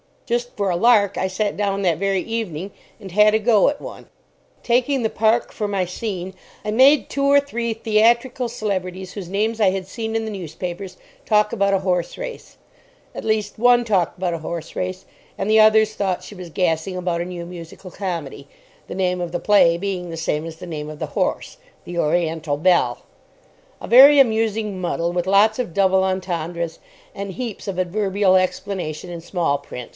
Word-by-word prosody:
Just 240 Hz, +1 st, -2 dB
for 200 Hz, -2 st, -1 dB
a 175 Hz, -, 0 dB
lark, 205 Hz, -1 st, +4 dB
I 190 Hz, -, 0 dB
sat 200 Hz, +2 st, -2 dB
down 200 Hz, -1 st, -1 dB
that 175 Hz, -5 st, +1 dB
very 195 Hz, 0 st, 0 dB
evening 200 Hz, -5 st, -4 dB, 0.3 s
and 195 Hz, -3 st, -9 dB
had 210 Hz, +3 st, +5 dB
a -, -, +3 dB
go 220 Hz, -2 st, +4 dB
at 285 Hz, 0 st, -1 dB
one. -, -, -9 dB, 0.6 s
Taking 250 Hz, +2 st, +1 dB
the 220 Hz, -, +1 dB
Park 225 Hz, +2 st, +1 dB
for 210 Hz, -, -3 dB
my 200 Hz, -2 st, 0 dB
scene, 185 Hz, 0 st, -5 dB, 0.3 s
I 210 Hz, -, -1 dB
made 260 Hz, +1 st, +5 dB
two 275 Hz, 0 st, -1 dB
or 280 Hz, 0 st, +5 dB
three 235 Hz, -5 st, -3 dB
theatrical 235 Hz, +3 st, +2 dB
celebrities 190 Hz, -5 st, -4 dB
whose 195 Hz, -4 st, -7 dB
names 220 Hz, +4 st, -1 dB
I 200 Hz, -4 st, +4 dB
had 190 Hz, -1 st, -4 dB
seen 220 Hz, +2 st, -5 dB
in 225 Hz, -, 0 dB
the 220 Hz, -, -4 dB
newspapers 180 Hz, 0 st, -6 dB, 0.3 s
talk 210 Hz, -1 st, +3 dB
about 200 Hz, -3 st, +1 dB
a 195 Hz, -, +3 dB
horse 180 Hz, -2 st, -1 dB
race. -, -, -8 dB, 0.6 s
At -, -, -7 dB
least, 215 Hz, -1 st, -1 dB
one 245 Hz, +1 st, +5 dB
talked 190 Hz, -7 st, 0 dB
about 180 Hz, -1 st, -1 dB
a -, -, -2 dB
horse 165 Hz, 0 st, -6 dB
race, 185 Hz, +1 st, -4 dB, 0.3 s
and 195 Hz, -, -2 dB
the 220 Hz, -, +6 dB
others 215 Hz, 0 st, +5 dB
thought 190 Hz, -4 st, -2 dB
she -, -, -10 dB
was 180 Hz, -3 st, -9 dB
gassing 170 Hz, +1 st, -1 dB
about 175 Hz, -2 st, -2 dB
a -, -, -3 dB
new 175 Hz, -1 st, -6 dB
musical 175 Hz, +1 st, -10 dB
comedy, 165 Hz, -8 st, -5 dB, 0.4 s
the -, -, -7 dB
name 180 Hz, -1 st, 0 dB
of 175 Hz, -1 st, -4 dB
the 175 Hz, -, -1 dB
play 185 Hz, -5 st, +4 dB
being 180 Hz, -1 st, -4 dB
the 165 Hz, -, -6 dB
same 160 Hz, -1 st, -2 dB
as 165 Hz, -1 st, -7 dB
the 165 Hz, -, -10 dB
name 155 Hz, -3 st, -6 dB
of 155 Hz, -, -8 dB
the -, -, -3 dB
horse, -, -, -1 dB, 0.3 s
"The 175 Hz, 0 st, -5 dB
Oriental 160 Hz, -2 st, 0 dB
Belle." 175 Hz, +3 st, +2 dB, 0.8 s
A -, -, -6 dB
very 275 Hz, +5 st, +8 dB
amusing 220 Hz, -5 st, +2 dB
muddle, 170 Hz, -1 st, -1 dB
with 175 Hz, 0 st, -2 dB
lots 210 Hz, +4 st, +4 dB
of 235 Hz, -9 st, -3 dB
doubles 190 Hz, -1 st, +3 dB
entendres, 170 Hz, -3 st, -3 dB, 0.3 s
and 200 Hz, -1 st, -6 dB
heaps 230 Hz, -1 st, -6 dB
of 195 Hz, -2 st, -4 dB
adverbial 190 Hz, +1 st, +2 dB
explanation 185 Hz, -3 st, -3 dB
in 170 Hz, -1 st, -6 dB
small 165 Hz, -4 st, -1 dB
print. 125 Hz, -4 st, -9 dB
195 Hz, 190 wpm, -21 LUFS, 175-220 Hz, 0.8 s, very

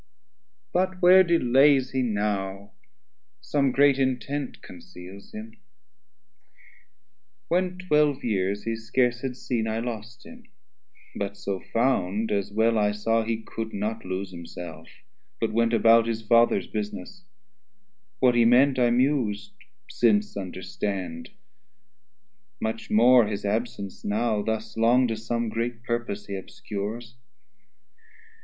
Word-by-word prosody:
But 185 Hz, +1 st, 0 dB
where 185 Hz, +1 st, +7 dB
delays 135 Hz, -4 st, +3 dB
he 130 Hz, -1 st, 0 dB
now? 100 Hz, -3 st, -2 dB, 0.7 s
some 140 Hz, -2 st, 0 dB
great 140 Hz, +1 st, +4 dB
intent 135 Hz, +1 st, -2 dB
Conceals 90 Hz, +2 st, -12 dB
him: 220 Hz, +1 st, -9 dB, 1.9 s
when 180 Hz, +1 st, 0 dB
twelve 150 Hz, -6 st, +1 dB
years 100 Hz, -2 st, -1 dB
he 115 Hz, 0 st, -2 dB
scarce 120 Hz, +2 st, 0 dB
had 130 Hz, -2 st, -4 dB
seen, 115 Hz, -5 st, -2 dB
I 110 Hz, 0 st, -2 dB
lost 115 Hz, -1 st, -7 dB
him, -, -, -13 dB, 0.7 s
but 100 Hz, 0 st, -4 dB
so 100 Hz, -1 st, -4 dB
found, 115 Hz, -3 st, 0 dB
as 100 Hz, -1 st, -1 dB
well 110 Hz, +1 st, +2 dB
I 105 Hz, 0 st, +2 dB
saw 115 Hz, +2 st, +1 dB
He 110 Hz, 0 st, -3 dB
could 110 Hz, 0 st, -6 dB
not 110 Hz, +3 st, -3 dB
lose 95 Hz, +1 st, -4 dB
himself; 85 Hz, -2 st, -9 dB, 0.5 s
but -, -, -1 dB
went 115 Hz, +1 st, +2 dB
about 115 Hz, 0 st, +5 dB
His 115 Hz, -1 st, -3 dB
Father's 115 Hz, -3 st, +3 dB
business; 105 Hz, -, -6 dB, 1.0 s
what 125 Hz, -1 st, +4 dB
he 120 Hz, -1 st, +4 dB
meant 130 Hz, +3 st, +4 dB
I 120 Hz, -1 st, +4 dB
mus'd, 125 Hz, -, 0 dB, 0.3 s
Since 105 Hz, -3 st, +1 dB
understand; 100 Hz, -, -5 dB, 1.3 s
much 110 Hz, 0 st, -4 dB
more 120 Hz, +1 st, +5 dB
his 105 Hz, -1 st, -4 dB
absence 100 Hz, -2 st, -3 dB
now 110 Hz, +1 st, 0 dB
100 105 Hz, -, -3 dB
Thus 110 Hz, 0 st, -3 dB
long 120 Hz, +3 st, +4 dB
to 115 Hz, -, -1 dB
some 115 Hz, +1 st, -3 dB
great 115 Hz, +1 st, -3 dB
purpose 120 Hz, -4 st, -3 dB
he 100 Hz, -, -7 dB
obscures. 105 Hz, +4 st, -6 dB
115 Hz, 125 wpm, -25 LUFS, 105-125 Hz, 1.9 s, where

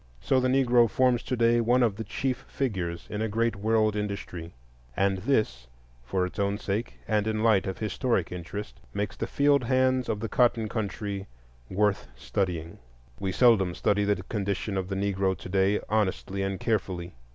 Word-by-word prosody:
So 130 Hz, -, +2 dB
the 130 Hz, -, +1 dB
Negro 125 Hz, -3 st, +4 dB
forms 125 Hz, +2 st, +2 dB
to 125 Hz, -, -2 dB
day 120 Hz, 0 st, +3 dB
one 120 Hz, +2 st, +3 dB
of 110 Hz, -4 st, +2 dB
the 110 Hz, -, -4 dB
chief 130 Hz, +4 st, -2 dB
figures 90 Hz, -10 st, -3 dB
in 105 Hz, -, -3 dB
a 110 Hz, -, 0 dB
great 115 Hz, +2 st, +1 dB
world 110 Hz, +1 st, +2 dB
industry; 100 Hz, -5 st, -4 dB, 0.5 s
and 95 Hz, -1 st, +2 dB
this, 95 Hz, -, 0 dB, 0.4 s
for 90 Hz, +9 st, 0 dB
its 90 Hz, +3 st, -7 dB
own 100 Hz, 0 st, +1 dB
sake, 105 Hz, +3 st, -3 dB
and 105 Hz, -1 st, +1 dB
in 110 Hz, 0 st, 0 dB
the 110 Hz, -, -1 dB
light 110 Hz, -5 st, +4 dB
of 95 Hz, -, -3 dB
historic 110 Hz, -3 st, -1 dB
interest, 90 Hz, +1 st, -6 dB, 0.2 s
makes 105 Hz, -1 st, -2 dB
the 115 Hz, -, -3 dB
field 140 Hz, 0 st, +3 dB
hands 130 Hz, 0 st, +2 dB
of 105 Hz, -, -1 dB
the 115 Hz, -, -3 dB
cotton 115 Hz, -1 st, +2 dB
country 100 Hz, -2 st, -4 dB, 0.4 s
worth 105 Hz, +1 st, +1 dB
studying. 85 Hz, -4 st, -3 dB, 0.4 s
We 95 Hz, -1 st, -1 dB
seldom 100 Hz, -6 st, +4 dB
study 105 Hz, 0 st, +1 dB
the 105 Hz, 0 st, 0 dB
condition 100 Hz, -2 st, -2 dB
of 95 Hz, -1 st, -1 dB
the 95 Hz, -, -3 dB
Negro 95 Hz, -1 st, 0 dB
to -, -, -9 dB
day 95 Hz, +2 st, +2 dB
honestly 100 Hz, -2 st, 0 dB
and 95 Hz, -1 st, -2 dB
carefully. 90 Hz, -5 st, -2 dB
105 Hz, 180 wpm, -27 LUFS, 95-115 Hz, 0.5 s, Negro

